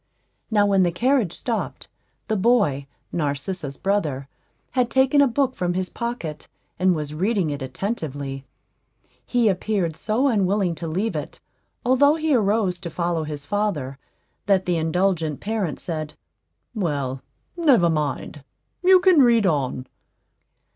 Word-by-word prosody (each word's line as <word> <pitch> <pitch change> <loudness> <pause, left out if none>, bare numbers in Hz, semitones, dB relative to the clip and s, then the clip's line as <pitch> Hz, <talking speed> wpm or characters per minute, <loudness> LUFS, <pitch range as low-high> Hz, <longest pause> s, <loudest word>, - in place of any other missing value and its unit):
Now, 210 -2 +3
when 195 -1 +3
the 175 -1 +3
carriage 240 - +1
stopped, 230 -3 -4 0.4
the 220 - 0
boy, 195 - +2 0.2
Narcissa's 145 -1 -3
brother, 155 -10 -1 0.4
had 250 -2 +1
taken 265 +2 +4
a 280 - +5
book 260 +1 0
from 175 -1 -1
his 185 0 -1
pocket, 235 -11 -5 0.3
and 185 -1 +3
was 150 -1 -4
reading 185 0 0
it 145 -1 -5
attentively; 140 - -4 0.8
he 245 -2 +1
appeared 190 -4 0
so 225 - 0
unwilling 200 -5 +1
to 165 +1 -6
leave 195 +8 -1
it, - - -5 0.5
although 285 +4 +5
he 315 -2 0
arose 205 -5 +1
to 170 - -6
follow 170 -1 -1
his 150 -2 -6
father, 165 -11 -2 0.5
that 195 -2 +3
the 175 -2 +1
indulgent 165 -2 0
parent 205 -7 -2
said, 155 -3 -5 0.6
"Well, 140 - -2 0.3
never 280 - +4
mind; 150 -2 -2 0.4
you 370 0 +6
can 365 -4 +5
read 235 -4 +4
on." 135 -6 0
185 Hz, 135 wpm, -23 LUFS, 155-225 Hz, 0.8 s, you